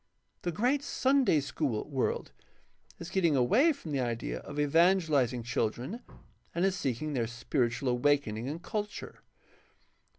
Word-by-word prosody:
The 175 - -2
great 250 - +1
Sunday 265 - +2
school 135 -5 -2
world 135 - -1 0.7
is 170 +2 -8
getting 170 -6 +2
away 215 - +4
from 260 - -7
the 140 - 0
idea 120 -2 -2
of 145 0 -7
evangelizing 150 -6 +3
children 120 - -2 0.5
and 175 +2 +2
is 195 -1 +1
seeking 145 -2 -2
their 120 -4 0
spiritual 120 +2 -1
awaken 125 -2 +2
ing 115 +4 -4
and 165 +4 -6
culture. 210 -2 -5
145 Hz, 135 wpm, -30 LUFS, 125-190 Hz, 0.7 s, away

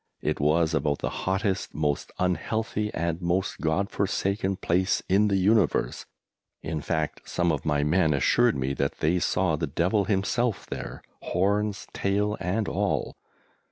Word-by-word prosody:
It 75 - 0
was 80 +3 +2
about 75 -2 +1
the - - -3
hottest, 95 +1 -1
most 75 -1 -1
unhealthy, 105 +4 -1
and 85 +1 -2
most 90 +3 -1
God 85 +5 0
forsaken 100 0 0
place 95 +1 +1
in 100 +3 +4
the 100 -1 +2
universe 100 -1 +2 0.6
in 80 -2 -3
fact 80 0 -2
some 85 -1 +1
of 75 0 -3
my 75 -1 +2
men 80 +2 +3
assured 70 - +3
me 65 +1 -1
that 70 +1 -1
they 85 +4 +1
saw 90 -2 +1
the - - -2
Devil 95 +4 +1
himself 105 +1 0
there, - - -7 0.2
horns, 100 +3 0
tail 105 +2 0
and 95 +4 -1
all! - - -1
90 Hz, 150 wpm, -26 LUFS, 80-100 Hz, 0.6 s, in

